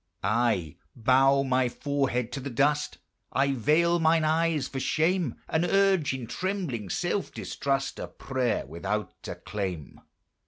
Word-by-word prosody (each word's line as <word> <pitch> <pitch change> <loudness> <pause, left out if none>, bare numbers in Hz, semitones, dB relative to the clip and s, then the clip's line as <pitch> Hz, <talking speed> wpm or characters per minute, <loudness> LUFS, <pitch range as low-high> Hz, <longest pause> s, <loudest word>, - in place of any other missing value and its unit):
I 105 -6 +1 0.2
bow 135 +3 +4
my 130 -1 +2
forehead 135 -3 -1
to 140 - -4
the 140 +1 -5
dust, 145 +4 +1 0.3
I 140 +1 +2
veil 165 +7 +3
mine 160 0 +3
eyes 155 -2 +1
for 135 - -5
shame, 160 -1 +1
And 160 - +1
urge, 195 -3 +3
in 130 -2 -4
trembling 165 - -3
self - - -1
distrust, 135 -1 -2
A - - -4
prayer 130 -3 -2
without 85 +9 -3
a - - -4
claim. 95 -7 -5
135 Hz, 140 wpm, -27 LUFS, 120-160 Hz, 0.3 s, bow